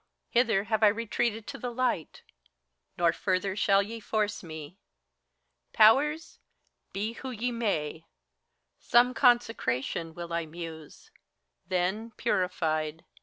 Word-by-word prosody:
hither 230 Hz, -5 st, +3 dB
have 220 Hz, 0 st, -1 dB
I 215 Hz, -, +7 dB
retreated 225 Hz, +1 st, 0 dB
to -, -, -7 dB
the 245 Hz, -, -3 dB
light; 240 Hz, -9 st, -2 dB, 0.7 s
Nor 170 Hz, -1 st, +3 dB
further 190 Hz, 0 st, -1 dB
shall 200 Hz, -1 st, +3 dB
ye 225 Hz, +3 st, -7 dB
force 210 Hz, -1 st, -1 dB
me. 160 Hz, +1 st, -9 dB, 0.9 s
Powers, 290 Hz, +9 st, +4 dB, 0.5 s
be 210 Hz, +4 st, -3 dB
who 260 Hz, -, -7 dB
ye 245 Hz, 0 st, -2 dB
may! 165 Hz, -9 st, -2 dB, 0.7 s
Some 245 Hz, +1 st, +4 dB
consecration 225 Hz, -, +1 dB
will 170 Hz, -1 st, -6 dB
I 170 Hz, -1 st, -1 dB
muse: 160 Hz, -2 st, -9 dB, 0.6 s
then, 190 Hz, +5 st, -1 dB
purified. 160 Hz, -4 st, -1 dB
205 Hz, 115 wpm, -29 LUFS, 170-230 Hz, 0.9 s, I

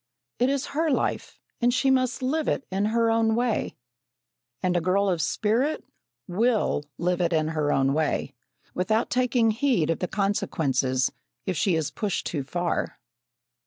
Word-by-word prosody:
It 250 Hz, +2 st, +3 dB
is 275 Hz, -1 st, 0 dB
her 320 Hz, +2 st, +1 dB
life, 275 Hz, -, -1 dB, 0.2 s
and 240 Hz, +1 st, +4 dB
she 265 Hz, +2 st, +2 dB
must 255 Hz, -1 st, +1 dB
live 305 Hz, +4 st, 0 dB
it 270 Hz, -, 0 dB
in 195 Hz, +2 st, 0 dB
her 230 Hz, +1 st, +2 dB
own 225 Hz, -1 st, +2 dB
way, 240 Hz, -1 st, 0 dB, 0.9 s
and 180 Hz, -1 st, +1 dB
a 175 Hz, -, +2 dB
girl 195 Hz, +3 st, +2 dB
of 175 Hz, -4 st, +1 dB
spirit 230 Hz, -, 0 dB, 0.4 s
will 215 Hz, -4 st, +1 dB
live 180 Hz, +1 st, 0 dB
it 170 Hz, 0 st, +1 dB
in 155 Hz, -1 st, +1 dB
her 155 Hz, -2 st, 0 dB
own 135 Hz, 0 st, +2 dB
way, 150 Hz, -2 st, -1 dB, 0.4 s
without 215 Hz, +6 st, 0 dB
taking 245 Hz, -2 st, +2 dB
heed 220 Hz, -, +1 dB
of 165 Hz, -, -2 dB
the 180 Hz, -, -1 dB
consequences, 135 Hz, -11 st, 0 dB, 0.3 s
if 185 Hz, -, -1 dB
she 185 Hz, 0 st, +2 dB
is 160 Hz, -3 st, -1 dB
pushed 210 Hz, -4 st, -2 dB
too 150 Hz, -, -2 dB
far. 175 Hz, +5 st, -2 dB
200 Hz, 160 wpm, -26 LUFS, 165-245 Hz, 0.9 s, and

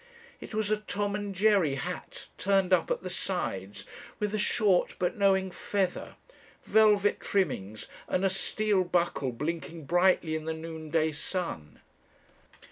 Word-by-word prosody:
It -, -, -8 dB
was 215 Hz, -1 st, 0 dB
a 215 Hz, -, +3 dB
Tom 205 Hz, -1 st, -2 dB
and 205 Hz, -1 st, -4 dB
Jerry 195 Hz, -8 st, +3 dB
hat 175 Hz, +5 st, -6 dB
turned 195 Hz, 0 st, +2 dB
up 175 Hz, -3 st, +3 dB
at -, -, -1 dB
the 185 Hz, -, -4 dB
sides, 105 Hz, -, -4 dB, 0.3 s
with 210 Hz, 0 st, -2 dB
a 215 Hz, -, 0 dB
short 205 Hz, -3 st, +2 dB
but 180 Hz, 0 st, 0 dB
knowing 190 Hz, -2 st, +2 dB
feather, 190 Hz, 0 st, -2 dB, 0.5 s
velvet 210 Hz, -2 st, +4 dB
trimmings, 110 Hz, -, -1 dB, 0.2 s
and 185 Hz, -, 0 dB
a -, -, +4 dB
steel 205 Hz, 0 st, +1 dB
buckle 170 Hz, -7 st, 0 dB
blinking 160 Hz, +4 st, -4 dB
brightly 175 Hz, -1 st, +3 dB
in 160 Hz, 0 st, -3 dB
the 160 Hz, 0 st, -2 dB
noonday 160 Hz, 0 st, -2 dB
sun. 150 Hz, -, -5 dB
185 Hz, 140 wpm, -29 LUFS, 160-200 Hz, 0.5 s, velvet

